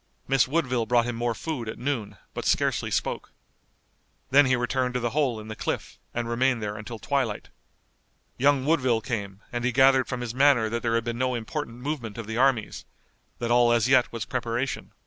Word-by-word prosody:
Miss 135 -1 +3
Woodville 130 -6 0
brought 120 0 +3
him 120 -1 -3
more 120 0 -1
food 130 -8 -4
at - - -6
noon, 125 -5 -3 0.2
but - - -4
scarcely - - +1
spoke. - - -2 1.0
Then 140 +1 +6
he 130 - +3
returned 125 0 -1
to - - +1
the 120 -1 -1
hole 135 -6 0
in 110 - -9
the 110 - -6
cliff, - - -4
and 120 0 -3
remained 125 +1 +1
there 105 -1 -4
until 110 +2 -7
twilight. - - -2 0.9
Young 140 0 +3
Woodville 130 -7 +2
came, 100 -4 -4
and 120 -1 -3
he 125 - +1
gathered 130 +1 +5
from 125 -2 -4
his 120 -2 -4
manner 130 -4 +4
that 115 +1 -2
there 115 -1 0
had 115 - +1
been 120 0 -4
no 130 -1 +1
important 120 +1 -5
movement 130 -8 -4
of 115 - -5
the 110 +1 -4
armies, 125 -4 +1 0.5
that 120 0 -2
all 120 0 +5
as 120 0 +3
yet 130 -1 +4
was 115 - -4
preparation. 125 +1 -3
120 Hz, 200 wpm, -26 LUFS, 115-130 Hz, 1.0 s, Then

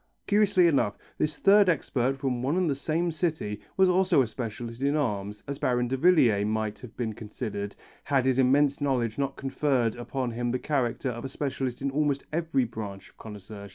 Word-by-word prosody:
Curiously 205 -3 +4
enough, 125 -11 +2 0.2
this 155 -1 0
third 200 +1 +5
expert 135 -5 0
from 130 -3 -2
one 140 +7 0
and 185 -2 +2
the 145 - +2
same 160 +5 -1
city 155 - -2 0.2
was 190 0 +6
also 180 -5 +4
a - - -1
specialist 115 +1 -6
in 140 +2 +2
arms, 105 -7 -2
as 140 0 -5
Baron 125 -1 +1
Davillier 130 - +4
might 110 0 -2
have 120 -2 -12
been 115 -3 -2
considered, 105 -1 -5 0.3
had 135 -2 +2
his 130 0 +2
immense 140 +2 +3
knowledge 125 -4 0
not 140 -1 -1
conferred 135 -4 0
upon 120 +1 -3
him 120 +1 -2
the 125 - 0
character 130 -2 -1
of 120 -1 -5
a 135 - -4
specialist 130 -2 -3
in 140 - 0
almost 145 -1 0
every 160 -6 +1
branch 105 -4 -7
of - - -28
connoisseurship. 105 -1 -9
130 Hz, 190 wpm, -27 LUFS, 115-145 Hz, 0.3 s, was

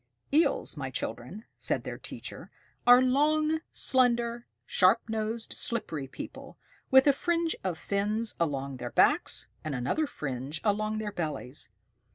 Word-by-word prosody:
"Eels, 315 - +2
my 135 -3 -4
children," 130 - -5
said - - 0
their - - -6
teacher, - - -8 0.4
"are 245 +1 +8
long, 305 +4 +2
slender, 240 -2 +2 0.2
sharp 190 +5 +4
nosed, 220 +1 -3
slippery 165 - 0
people, - - -9 0.3
with 265 0 +7
a 285 - +6
fringe 335 +2 0
of 180 -3 -2
fins 210 +5 0
along 140 -4 -2
their - - -5
backs, - - +2 0.2
and 155 -3 -3
another 130 - 0
fringe 135 - -4
along 215 +1 0
their 215 -1 -3
bellies. 150 - -4
215 Hz, 135 wpm, -29 LUFS, -, 0.4 s, are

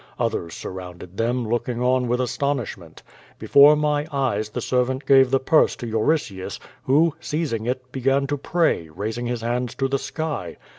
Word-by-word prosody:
Others 110 -9 -2
surrounded 90 0 -8
them, 120 +1 0
looking 120 +1 -2
on 125 0 +2
with 125 +1 0
astonishment. 125 - -3 0.3
Before 145 +2 +6
my 150 0 0
eyes 120 -7 -1
the - - -4
servant 130 +2 0
gave 135 -2 +6
the 135 +1 +2
purse 155 +4 +3
to 120 - -7
Euritius, 110 -3 -1 0.3
who, 150 +4 +3
seizing 150 -8 -2
it, 125 0 -3
began 135 +2 +1
to 145 +1 -2
pray, 160 - 0
raising 110 +9 -4
his 120 -1 -3
hands 120 +1 -2
to 135 - 0
the 135 0 -1
sky. 145 - -4
125 Hz, 160 wpm, -23 LUFS, 115-140 Hz, 0.3 s, Before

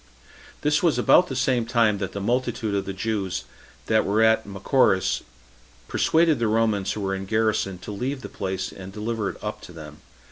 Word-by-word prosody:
This 150 0 +2
was 170 -4 +2
about 180 - +5
the 135 - -5
same 130 -2 +1
time 115 -4 +2
that 95 -2 -3
the 100 - -5
multitude 120 0 -1
of 100 -1 -1
the 95 - -4
Jews 95 -2 -2 0.4
that 110 0 +3
were 105 +3 +2
at 110 -1 +3
Machaerus 95 0 +2 0.7
persuaded 160 -4 +2
the 115 - +1
Romans 110 -3 +1
who 105 - -5
were 95 -1 -1
in 95 0 -4
garrison 110 -3 0
to 90 - -8
leave 130 +6 -3
the - - -5
place, 95 -1 -4
and 95 0 -9
deliver 105 0 -2
it 90 - -8
up - - -4
to - - -11
them. - - -10
110 Hz, 190 wpm, -24 LUFS, 95-120 Hz, 0.7 s, about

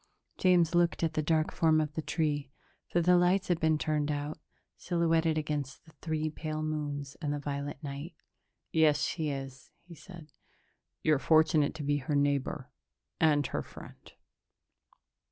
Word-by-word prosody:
James 175 -3 +4
looked 175 -1 +2
at 160 -1 +1
the 155 - 0
dark 155 +1 +1
form 160 -1 +3
of 150 -1 -2
the 160 - -3
tree 150 -4 -1 0.4
for 175 - +1
the 180 +1 +5
lights 180 +2 +2
had 175 -2 +2
been 160 -1 +2
turned 150 -1 -1
out 145 +1 -3 0.4
silhouetted 165 -2 +1
against 150 -3 -3
the 160 - -17
three 155 -1 -1
pale 155 0 -4
moons 145 -2 -4
and 145 -3 -1
the 145 - -1
violet 145 0 -4
night. 145 +4 -6 0.6
"Yes, 155 -2 +3
she 160 -3 -1
is," 135 -2 -6
he 175 - -13
said. 165 -2 -13 0.7
"You're 155 -3 +3
fortunate 155 -1 +3
to 150 - -5
be 145 0 +1
her 145 +1 -2
neighbor... 140 -1 0 0.5
and 150 -3 +3
her - - -2
friend." - - -13
155 Hz, 155 wpm, -30 LUFS, 145-160 Hz, 0.7 s, the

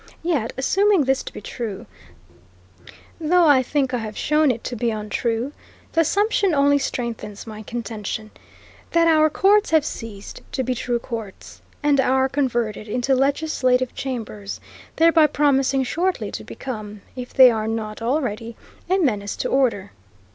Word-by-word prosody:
Yet, 295 -10 0
assuming 390 +6 +3
this 265 0 +1
to - - -8
be - - -9
true, 225 -6 -6 1.3
though 340 +2 +3
I 285 -4 +6
think 265 0 -1
I 245 - 0
have 215 -1 -6
shown 300 0 +2
it 235 -3 -1
to 245 - -4
be 235 +1 0
untrue, 225 +3 -2 0.4
the 330 - +3
assumption 400 +1 +2
only 285 0 +4
strengthens 225 -6 -4
my 215 -1 -8
contention, 215 -1 -5 0.6
that 335 0 +4
our 310 -1 +5
courts 405 +6 +3
have 315 -2 +3
ceased 210 -3 -7
to 260 - -1
be 255 +1 -1
true 245 -1 -1
courts, 230 -5 -8 0.2
and 290 -1 +3
are 265 0 +2
converted 240 -6 -1
into 245 +5 0
legislative 265 -2 +1
chambers, 220 -6 -5 0.4
thereby 325 -1 +5
promising 275 -2 +2
shortly 355 +8 -1
to - - -6
become, 215 -5 -7
if 250 -1 -7
they 260 -2 +8
are 220 -1 -2
not 220 -1 -4
already, 230 -3 -2 0.3
a 375 - +3
menace 210 - 0
to - - -3
order. 235 -8 +1
255 Hz, 150 wpm, -22 LUFS, 225-295 Hz, 1.3 s, they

